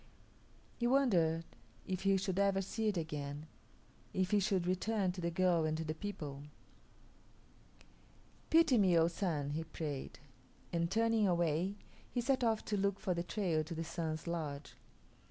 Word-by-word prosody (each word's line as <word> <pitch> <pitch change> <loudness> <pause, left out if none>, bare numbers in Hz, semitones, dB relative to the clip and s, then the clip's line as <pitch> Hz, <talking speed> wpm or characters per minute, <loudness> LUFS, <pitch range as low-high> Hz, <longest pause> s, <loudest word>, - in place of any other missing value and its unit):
He 240 - +2
wondered 175 -12 +3 0.4
if 185 -1 -3
he 195 0 +3
should 190 0 -1
ever 200 -1 +3
see 220 +3 -2
it 205 -3 +1
again; 150 -2 -4 0.7
if 185 0 +1
he 210 - +5
should 190 -2 +1
return 185 +1 +1
to 180 0 -7
the 170 - 0
girl 175 -1 +2
and 155 0 0
to 160 - -2
the 155 - -2
people. 155 -6 -6 2.1
"Pity 320 -7 +5
me, 185 -4 +5
O 165 0 +5
Sun!" 165 -5 -1
he 160 +2 -2
prayed; 150 -4 -5 0.6
and 170 0 +1
turning 225 0 +3
away, 175 +2 +1 0.3
he 245 - -2
set 260 +1 +1
off 225 -2 +1
to 210 - -1
look 200 0 +1
for 195 -4 0
the 170 - -1
trail 175 -3 0
to 165 +2 -6
the 165 - -2
Sun's 160 -2 -3
lodge. 155 -4 -4
180 Hz, 160 wpm, -35 LUFS, 160-200 Hz, 2.1 s, he